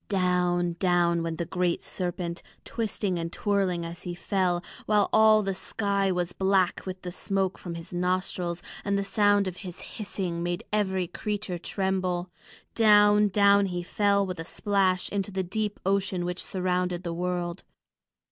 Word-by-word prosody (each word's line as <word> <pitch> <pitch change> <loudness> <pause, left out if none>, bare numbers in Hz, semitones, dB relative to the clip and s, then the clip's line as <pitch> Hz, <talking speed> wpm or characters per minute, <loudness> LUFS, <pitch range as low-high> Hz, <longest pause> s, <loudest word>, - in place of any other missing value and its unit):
Down, 180 -2 +1
down 175 -2 +3
went 165 -1 -3
the 170 - -2
great 180 0 -1
serpent, 175 -1 -3 0.2
twisting 205 -5 -2
and 165 0 -3
twirling 190 -4 0
as 170 +1 -7
he 175 -1 -5
fell, 180 -1 0 0.2
while 210 -2 +3
all 220 -1 +6
the 195 0 -1
sky 200 0 0
was 180 -1 -1
black 190 -1 +1
with 185 0 -6
the 180 - -4
smoke 195 +1 -1
from 175 -2 -6
his 170 +2 -8
nostrils, 180 -1 -1 0.2
and 200 0 0
the 200 - 0
sound 205 0 +3
of 185 -1 -5
his 180 -3 -8
hissing 185 -5 -4
made 175 +4 -2
every 190 -3 +1
creature 200 0 -4
tremble. 185 -1 -1 0.4
Down, 210 -1 +6
down 200 0 +4
he 175 -1 -3
fell 200 +2 +2
with 185 -3 -5
a - - -2
great 165 - -8
splash 195 -3 +1
into 200 -1 -2
the 190 -1 -2
deep 210 +3 -3
ocean 190 -2 0
which 180 0 -2
surrounded 180 -1 -1
the 170 -2 -3
world. 175 0 -2
185 Hz, 165 wpm, -27 LUFS, 175-200 Hz, 0.4 s, all